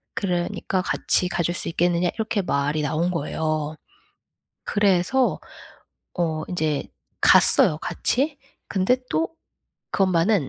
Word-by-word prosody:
그러니까 180 Hz, 0 st, -1 dB
같이 180 Hz, -, +1 dB
가 175 Hz, -, -1 dB
줄 175 Hz, -, 0 dB
수 -, -, -3 dB
있겠느냐 175 Hz, +1 st, +1 dB
이렇게 220 Hz, -2 st, -1 dB
말이 145 Hz, -1 st, 0 dB
나온 155 Hz, +4 st, 0 dB
거예요. 155 Hz, -1 st, -2 dB, 0.9 s
그래서 205 Hz, +5 st, +2 dB, 0.8 s
어 160 Hz, -3 st, -1 dB
인제 155 Hz, -5 st, -1 dB, 0.4 s
갔어요 150 Hz, -, +5 dB
같이. 280 Hz, -, -1 dB, 0.3 s
근데 190 Hz, +5 st, +2 dB
또 325 Hz, -, +1 dB, 0.7 s
그 -, -, +3 dB
엄마는 185 Hz, -2 st, +2 dB
175 Hz, 235 characters per minute, -23 LUFS, 155-200 Hz, 0.9 s, 갔어요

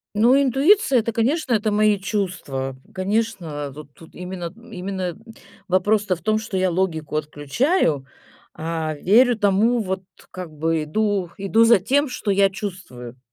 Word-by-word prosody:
Ну, 245 Hz, +6 st, +5 dB
интуиция- 275 Hz, -, +4 dB
это, 230 Hz, +1 st, -2 dB
конечно, 250 Hz, +5 st, 0 dB
это- 215 Hz, -1 st, +1 dB
мои 210 Hz, -1 st, +3 dB
чувства. 180 Hz, -10 st, -3 dB, 0.2 s
Конечно, 185 Hz, -8 st, -2 dB
тут 145 Hz, 0 st, -12 dB
тут 165 Hz, +3 st, -17 dB
именно 180 Hz, -1 st, -6 dB, 0.2 s
именно 185 Hz, -1 st, -4 dB
д -, -, -18 dB, 0.5 s
вопрос-то 195 Hz, +1 st, +2 dB
в 170 Hz, -, -15 dB
том, 215 Hz, +5 st, +1 dB
что 220 Hz, -3 st, -4 dB
я 185 Hz, -1 st, +1 dB
логику 165 Hz, -4 st, -2 dB
отключаю, 150 Hz, -, 0 dB, 0.5 s
а 160 Hz, -1 st, -3 dB
верю 235 Hz, -, +4 dB
тому, 210 Hz, +4 st, +2 dB
вот, 190 Hz, -1 st, -3 dB, 0.3 s
как 180 Hz, -3 st, -7 dB
бы, 160 Hz, +1 st, -1 dB
иду 200 Hz, +3 st, -1 dB
иду 200 Hz, +3 st, +3 dB
за 230 Hz, -2 st, +6 dB
тем, 280 Hz, +9 st, +1 dB
что 240 Hz, -4 st, -2 dB
я 195 Hz, 0 st, +4 dB
чувствую. 180 Hz, -, -8 dB
190 Hz, 150 wpm, -22 LUFS, 165-220 Hz, 0.5 s, за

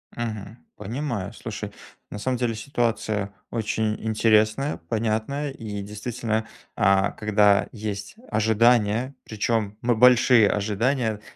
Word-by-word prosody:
Мгм. 110 Hz, -1 st, -5 dB, 0.2 s
Понимаю. 110 Hz, -2 st, -4 dB
Слушай, 105 Hz, -2 st, -6 dB, 0.4 s
на 105 Hz, -, -6 dB
самом 125 Hz, +4 st, -1 dB
деле 120 Hz, -2 st, -1 dB
ситуация 110 Hz, -5 st, -1 dB, 0.2 s
очень 110 Hz, -1 st, -1 dB
интересная, 110 Hz, +4 st, +2 dB
понятная 115 Hz, +6 st, -1 dB
и 105 Hz, -6 st, -6 dB
действительно, 110 Hz, +1 st, -3 dB, 0.3 s
а, 95 Hz, 0 st, +3 dB
когда 105 Hz, -1 st, +3 dB
есть 105 Hz, -, -5 dB
ожидания, 115 Hz, +3 st, +2 dB
причём 105 Hz, -1 st, -1 dB
мы 120 Hz, -1 st, +2 dB
большие 120 Hz, -2 st, +6 dB
ожидания, 110 Hz, +2 st, 0 dB
110 Hz, 105 wpm, -24 LUFS, 105-120 Hz, 0.4 s, большие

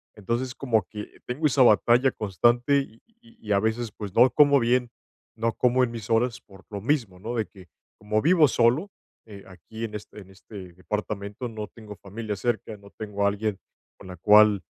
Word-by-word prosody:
Entonces, 120 Hz, +5 st, -3 dB
como 115 Hz, -6 st, 0 dB
que 105 Hz, -1 st, -10 dB
tengo 140 Hz, +6 st, -3 dB
esa 135 Hz, -2 st, +3 dB
batalla 120 Hz, +2 st, +5 dB
constante 120 Hz, +7 st, +2 dB
y 115 Hz, -5 st, -7 dB
y 235 Hz, +1 st, -25 dB
y 235 Hz, -, -23 dB
y -, -, -3 dB
a 100 Hz, -, +4 dB
veces, 110 Hz, +1 st, -2 dB
pues, 100 Hz, -3 st, -7 dB
no 125 Hz, +3 st, +6 dB
como 140 Hz, -1 st, +5 dB
bien, 120 Hz, +1 st, +1 dB, 0.5 s
no 115 Hz, 0 st, -1 dB
como 125 Hz, +1 st, +2 dB
en 120 Hz, -, -1 dB
mis 115 Hz, 0 st, -8 dB
horas 115 Hz, +1 st, +1 dB
por 95 Hz, -1 st, -18 dB
lo 100 Hz, -1 st, -5 dB
mismo, 115 Hz, -8 st, -1 dB
¿no?, 115 Hz, +5 st, -5 dB
de 110 Hz, -2 st, 0 dB
que, 95 Hz, -3 st, -17 dB, 0.3 s
como 105 Hz, +1 st, -1 dB
vivo 165 Hz, -2 st, +5 dB
solo, 125 Hz, -, +2 dB, 0.4 s
eh, 100 Hz, -2 st, -11 dB
aquí 110 Hz, +4 st, -10 dB
en 110 Hz, -2 st, -5 dB
este 105 Hz, 0 st, -9 dB
en 95 Hz, -1 st, -14 dB
este 95 Hz, -2 st, -12 dB
departamento, 105 Hz, +4 st, -5 dB
no 110 Hz, -2 st, -6 dB
tengo 105 Hz, -3 st, -12 dB
familia 105 Hz, +1 st, -6 dB
cerca, 110 Hz, 0 st, -3 dB
no 100 Hz, 0 st, -16 dB
tengo 105 Hz, -2 st, -4 dB
a -, -, +5 dB
alguien 105 Hz, -1 st, -3 dB, 0.4 s
con -, -, -12 dB
la 90 Hz, -1 st, -9 dB
cual, 105 Hz, +1 st, +5 dB
110 Hz, 200 wpm, -25 LUFS, 100-125 Hz, 0.5 s, no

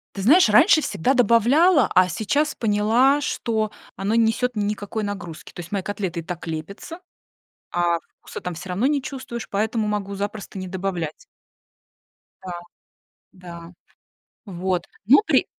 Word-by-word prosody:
Ты 195 Hz, -, -4 dB
знаешь, 295 Hz, -, +6 dB
раньше 310 Hz, -, +6 dB
всегда 265 Hz, -, 0 dB
добавляла, 250 Hz, -, +4 dB
а 185 Hz, 0 st, +5 dB
сейчас 285 Hz, -, 0 dB
поняла, 230 Hz, +6 st, +3 dB
что 220 Hz, -6 st, -1 dB, 0.2 s
оно 200 Hz, +3 st, -2 dB
не 230 Hz, -, +5 dB
несет 250 Hz, +2 st, -1 dB
никакой 210 Hz, +1 st, -2 dB
нагрузки. 175 Hz, -6 st, -7 dB
То -, -, -9 dB
есть 170 Hz, 0 st, -9 dB
мои 200 Hz, -2 st, -2 dB
котлеты 190 Hz, -4 st, -3 dB
и -, -, -9 dB
так 165 Hz, 0 st, -7 dB
лепятся, 165 Hz, -, -6 dB, 0.7 s
а 175 Hz, -1 st, +1 dB, 0.2 s
вкуса -, -, -9 dB
там 180 Hz, -1 st, -5 dB
всё 180 Hz, +3 st, -9 dB
равно 195 Hz, +8 st, +1 dB
не 290 Hz, -1 st, +1 dB
чувствуешь, 255 Hz, -4 st, -6 dB
поэтому 215 Hz, +2 st, -1 dB
могу 200 Hz, -1 st, -3 dB
запросто 205 Hz, 0 st, -5 dB
не 185 Hz, 0 st, -5 dB
добавлять. 180 Hz, -4 st, -4 dB, 1.2 s
Да. 185 Hz, -, -6 dB, 0.8 s
Да, 170 Hz, -2 st, -11 dB, 0.7 s
вот. 185 Hz, -2 st, -2 dB, 0.2 s
Но 265 Hz, -, +8 dB
при -, -, +3 dB
205 Hz, 145 wpm, -23 LUFS, 180-235 Hz, 1.2 s, Но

